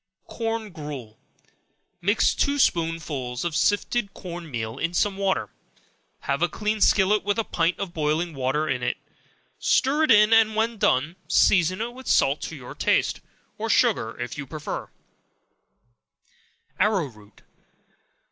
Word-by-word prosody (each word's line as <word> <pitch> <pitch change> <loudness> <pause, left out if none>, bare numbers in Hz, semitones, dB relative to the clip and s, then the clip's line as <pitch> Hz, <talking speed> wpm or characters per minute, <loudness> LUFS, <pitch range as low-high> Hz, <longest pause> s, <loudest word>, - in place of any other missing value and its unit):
Corn 225 -2 -4
Gruel. 145 -9 -8 0.8
Mix 205 +5 +3
two 280 0 0
spoonsful 160 - 0
of 170 -3 -2
sifted 205 +5 0
corn 175 -3 -8
meal 110 -4 -4
in 170 +1 -2
some 200 +2 +1
water; 195 -1 -1 0.7
have - - -2
a - - +2
clean 210 0 -2
skillet 205 +2 +4
with 205 +1 0
a 225 - +1
pint 170 -3 0
of 195 -4 -5
boiling 155 +2 -1
water 135 +3 -1
in 125 - -1
it; 125 0 -1 0.6
stir 290 +4 +2
it - - -6
in, 210 -1 +6
and 220 -1 +4
when 225 0 0
done, 155 +5 +1
season 185 +2 +3
it 235 +1 -3
with 260 +1 -12
salt 140 +3 +3
to 160 - -5
your 125 -4 -9
taste, - - +1 0.4
or - - -3
sugar, 115 +1 +2
if 120 +4 -5
you 140 - -6
prefer 150 +3 -5
it; - - -29 1.9
Arrow 205 -6 +2
root. 110 -5 -16
175 Hz, 145 wpm, -24 LUFS, 145-210 Hz, 1.9 s, in